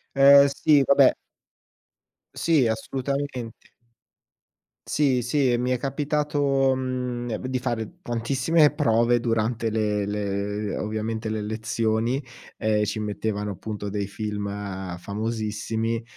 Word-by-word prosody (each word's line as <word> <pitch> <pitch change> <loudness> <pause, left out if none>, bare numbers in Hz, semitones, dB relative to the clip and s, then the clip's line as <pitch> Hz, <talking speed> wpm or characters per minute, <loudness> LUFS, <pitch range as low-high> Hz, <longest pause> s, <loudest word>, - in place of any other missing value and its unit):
Eh 140 +1 +8
sì, 145 0 +4
vabbè 140 -1 +6 1.2
Sì 155 -7 +2
assolutamente. 130 +1 -4 1.1
Sì, 135 -4 +2
sì, 125 0 +2
mi 125 +1 -1
è 125 - 0
capitato, 140 -1 +1
mhmm, 125 -2 -3
ne 115 -2 -3
di 130 - 0
fare 120 +7 -4
tantissime 135 +5 +2
prove 120 -4 +3
durante 115 0 0
le 105 -2 0
le 105 0 -2
ovviamente, 110 +1 -3
le 110 -1 -2
lezioni. 110 +3 -1 0.4
Ehm, 105 -1 +1
ci 105 +1 -3
mettevano 105 -1 -3
appunto 105 +1 -6
dei 100 -1 -2
film 105 0 -4 0.5
famosissimi, 110 +3 -3
115 Hz, 110 wpm, -25 LUFS, 110-135 Hz, 1.2 s, Eh